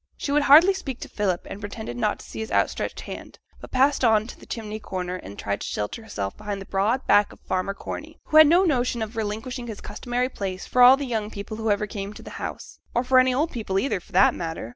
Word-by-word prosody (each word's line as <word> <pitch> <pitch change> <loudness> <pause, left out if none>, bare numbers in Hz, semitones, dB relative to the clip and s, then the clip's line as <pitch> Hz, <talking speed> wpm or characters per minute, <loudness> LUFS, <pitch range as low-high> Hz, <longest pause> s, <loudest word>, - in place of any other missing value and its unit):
She 280 - -3
would 295 +1 +4
hardly 310 +7 +7
speak 275 -10 -6
to - - -6
Philip, 190 -4 -1
and 195 - -7
pretended 205 - -6
not 120 - 0
to - - -13
see - - -8
his 220 - -5
outstretched - - 0
hand, - - -9 0.2
but - - -11
passed 270 +2 +2
on 220 -2 +4
to 245 - -11
the - - -15
chimney 215 -2 -5
corner, 185 -3 -4
and 100 - -10
tried 100 0 -3
to - - -4
shelter 105 - -3
herself 100 - -5
behind 205 -1 -5
the 195 - -8
broad 210 +8 0
back 205 0 +4
of - - -15
farmer 185 +2 -2
Corney, - - -7
who 310 - +2
had 310 -1 +10
no 345 +5 +5
notion 245 -8 +1
of 220 +2 -7
relinquishing 225 +3 -4
his 220 -3 -6
customary 245 0 -2
place 190 -6 -5
for 250 - +1
all 255 +2 +9
the 285 - -3
young 220 -4 -2
people 210 +1 -7
who 220 0 -2
ever 205 0 +1
came 200 0 -6
to - - -12
the - - -10
house, - - -7 0.2
or 240 - +2
for 255 0 +5
any 255 0 +4
old 295 +6 0
people 210 -6 -2
either, 200 -1 0
for 175 - -21
that 190 +2 +5
matter. 165 -8 -5
220 Hz, 250 wpm, -24 LUFS, 195-255 Hz, 0.2 s, had